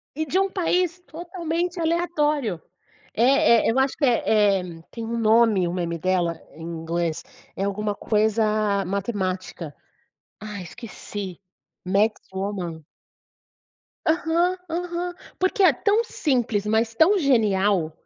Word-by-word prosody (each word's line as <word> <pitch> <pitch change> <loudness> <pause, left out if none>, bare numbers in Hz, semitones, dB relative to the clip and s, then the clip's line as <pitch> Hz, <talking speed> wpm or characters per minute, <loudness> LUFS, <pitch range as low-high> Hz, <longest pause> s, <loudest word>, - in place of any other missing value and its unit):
e 315 +1 -1
de 365 +6 +1
um 390 0 +2
país 360 -1 +1 0.2
totalmente 345 +1 -3
aleatório. 305 - +1 0.6
Eh 245 0 +5
eh, - - +4
eu 255 - -1
acho 265 0 +1
que, 290 - +2
eh 210 -5 +3
eh, 170 -2 -9
tem 230 - -6
um 235 +1 -3
nome 220 -4 +4
o 170 - -3
meme 170 -2 -2
dela, 175 -2 0
em 160 - -11
inglês, 165 0 -3 0.3
é 195 - -2
alguma 205 +1 -1
coisa 215 -2 +1
matemática. 185 -5 -3 0.7
Ai. 210 -3 -6
esqueci. 200 -2 -8 0.5
Math 205 +4 +2
woman. 185 -5 -4 1.2
Aham, 340 +2 +2
aham. 350 +1 -3 0.3
Porque 375 +2 +2
é 330 -7 +7
tão 420 - +2
simples, 245 - 0
mas 220 +1 +1
tão 360 - +4
genial, 205 - +2
220 Hz, 125 wpm, -24 LUFS, -, 1.2 s, é